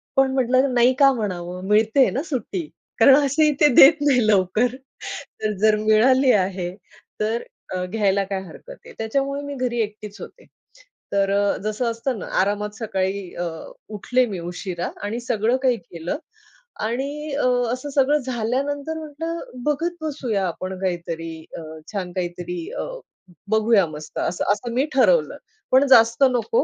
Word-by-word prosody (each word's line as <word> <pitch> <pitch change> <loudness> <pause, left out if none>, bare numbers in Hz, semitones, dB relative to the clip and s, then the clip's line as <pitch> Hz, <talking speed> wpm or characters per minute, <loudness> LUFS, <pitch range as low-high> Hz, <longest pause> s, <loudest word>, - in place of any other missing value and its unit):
पण 270 -1 +4
म्हटलं 260 +1 +2
नाही 245 +1 +4
का 275 -1 +7
म्हणावं. 180 -6 -4
मिळते 220 +5 +4
ना 270 - -1
सुट्टी 320 - -4 0.3
कारण 270 - +8
असेही 300 +3 +3
ते 300 - +8
देत 300 +2 +8
नाही 265 -5 +3
लवकर. 215 +5 +2 0.7
तर 215 - 0
जर 215 0 +5
मिळाली 245 +5 +4
आहे 185 -3 0 0.5
तर 220 +2 -1 0.3
अ, 180 - -2
घ्यायला 200 0 +1
काय 195 0 -4
हरकत 190 - -13 0.2
आहे. - - -11
त्याच्यामुळे 275 +5 -1
मी 285 0 -5
घरी 250 -2 -2
एकटीच 210 -1 -6
होते. - - -11 0.7
तर 195 -1 +2
अ, 200 0 +2
जसं 215 +3 -2
असतं 230 +1 -3
ना - - -6 0.2
आरामात 205 +2 -1
सकाळी 195 -3 -2
अ, 175 - -3 0.5
उठले 250 +5 +2
मी 195 -5 -5
उशिरा 175 +1 -4
आणि 210 +3 -3
सगळं 235 +1 +1
काही 250 -2 +3
केलं. 170 - -6 0.7
आणि 280 +6 -3
अ, 285 - +1 0.3
असं 255 +3 -5
सगळं 285 +2 +4
झाल्यानंतर 270 +5 -2
म्हटलं 320 +2 -5 0.2
बघत 320 +5 -1
बसूया 255 -10 -2
आपण 185 +2 -5
काहीतरी 170 -3 -3 0.3
अ, - - -6 0.3
छान 185 -3 -3
काहीतरी 175 -1 -4 0.2
अ, - - -1 0.7
बघूया 220 -2 +4
मस्त 150 0 -7
असं 175 - -1
असं 235 +3 -6
मी 260 +4 +2
ठरवलं. 480 - +3 0.3
पण 265 +2 +5
जास्त 230 +4 +4
नको, 250 - +1
225 Hz, 150 wpm, -22 LUFS, 195-270 Hz, 0.7 s, कारण